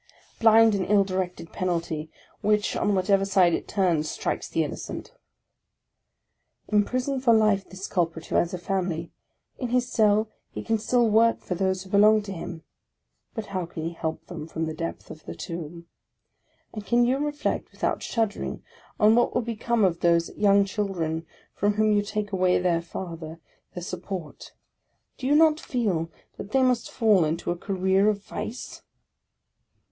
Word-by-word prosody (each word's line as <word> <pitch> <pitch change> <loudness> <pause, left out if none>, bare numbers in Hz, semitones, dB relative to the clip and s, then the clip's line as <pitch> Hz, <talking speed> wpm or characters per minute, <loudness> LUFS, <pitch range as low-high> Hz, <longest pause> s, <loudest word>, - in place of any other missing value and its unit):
Blind 225 0 +6
and 195 -2 0
ill 205 -1 +5
directed 185 -3 -4
penalty; 165 -4 -2 0.3
which, 210 0 +1
on 205 -1 +1
whatever 195 +1 +2
side 190 -3 +3
it - - -2
turns, 170 -6 +1
strikes - - -3
the - - +1
innocent! - - -6 1.6
Imprison 250 +6 +1
for 235 -3 +5
life 210 -3 +2
this 190 +1 -7
culprit 165 -3 -1
who - - -7
has 170 - +2
a 180 - -3
family: 175 -2 -2 0.5
in 250 - -2
his 245 0 +1
cell 215 0 +3 0.2
he - - -7
can 225 -1 0
still 240 +2 +2
work 225 +2 +4
for - - -4
those 190 +1 0
who 190 - -14
belong 210 +1 +5
to 200 - -7
him. 170 -2 -7 0.7
But 220 -2 -4
how 185 -3 -2
can 160 -1 -7
he 165 - -2
help 160 -1 -4
them 160 -3 -7
from 160 0 -3
the 160 - -4
depth 165 +1 -6
of 155 - -12
the - - -6
tomb? 170 0 -7 0.9
And 215 - -6
can 240 +2 +3
you 260 +3 +1
reflect 295 0 -2
without - - -2
shuddering, 225 -3 -2 0.4
on 210 +1 +6
what 240 +1 +2
will - - +1
become 230 -1 0
of 170 -2 0
those 170 -1 +2
young 200 -1 +4
children, 175 -6 -2 0.3
from 205 +1 +1
whom 215 0 +3
you 205 -1 +3
take 205 0 -3
away 185 -1 +3
their 175 -2 +1
father, 165 -2 -7 0.4
their 180 - -5
sup 180 0 -5
port? 180 -5 -7 0.7
Do 260 - -3
you 290 - +4
not 315 0 +5
feel 195 - -1 0.3
that 200 - -8
they 265 -1 +4
must 250 -2 +1
fall 215 -7 +3
into 160 +3 -1
a - - -1
career 190 +2 +1
of 205 -1 -2
vice 220 +4 -6
195 Hz, 170 wpm, -26 LUFS, 170-220 Hz, 1.6 s, Blind